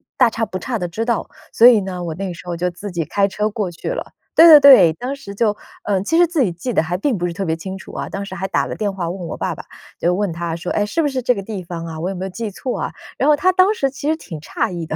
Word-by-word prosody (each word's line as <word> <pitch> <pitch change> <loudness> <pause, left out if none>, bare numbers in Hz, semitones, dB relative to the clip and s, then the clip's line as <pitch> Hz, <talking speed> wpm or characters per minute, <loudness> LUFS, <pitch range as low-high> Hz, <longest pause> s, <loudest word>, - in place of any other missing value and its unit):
大 250 -3 +5
差 225 0 -2
不 190 -3 -5
差 230 +4 -3
地 175 - -2
知 215 +7 -3
道。 235 -2 -1 0.2
所 235 - +7
以 225 -4 +6
呢， 185 -2 -5
我 160 -2 -4
那 190 -1 -4
时 175 - -12
候 175 - -3
就 180 +2 -1
自 190 +4 -8
己 170 -2 -2
开 200 +5 +1
车 210 +2 -1
过 205 -3 -3
去 175 - -6
了。 - - -5 0.2
对 330 - +9
对 310 -2 +11
对， 205 - +8
当 250 - -5
时 200 -7 -10
就， 210 -1 +1 0.3
呃， 195 -2 0
其 325 +11 0
实 350 - +6
自 330 -3 -1
己 230 - +3
记 185 +9 -4
得 - - +2
还 170 +2 -3
并 230 +2 0
不 175 - -1
是 170 - -4
特 195 +3 -3
别 165 -2 -1
清 190 +3 -6
楚 190 - -12
啊， - - -5
当 200 0 -5
时 190 - -8
还 190 +1 -3
打 - - 0
了 - - -5
电 205 -2 -2
话 175 -3 -3
问 180 -1 -5
我 - - -5
爸 - - -2
爸， - - -10 0.3
就 175 - +2
问 200 -3 -1
他 170 0 -3
说： 170 +1 -5
“哎， 205 - +1
是 330 +11 -1
不 295 - +1
是 260 -2 -2
这 250 +1 +2
个 195 - -5
地 205 -2 -5
方 170 -1 -6
啊， 160 -1 -7
我 175 +4 -2
有 195 - -4
没 185 - -5
有 190 - -3
记 220 +4 -5
错 245 +5 -4
啊？ - - -3 0.2
“然 - - +1
后 300 - +6
他 365 +6 +3
当 370 +3 +4
时 275 -10 0
其 285 +2 -6
实 315 - +2
挺 165 - -9
诧 160 - -2
异 170 -2 -4
的。 155 - -4
195 Hz, 345 characters per minute, -19 LUFS, 175-245 Hz, 0.3 s, 对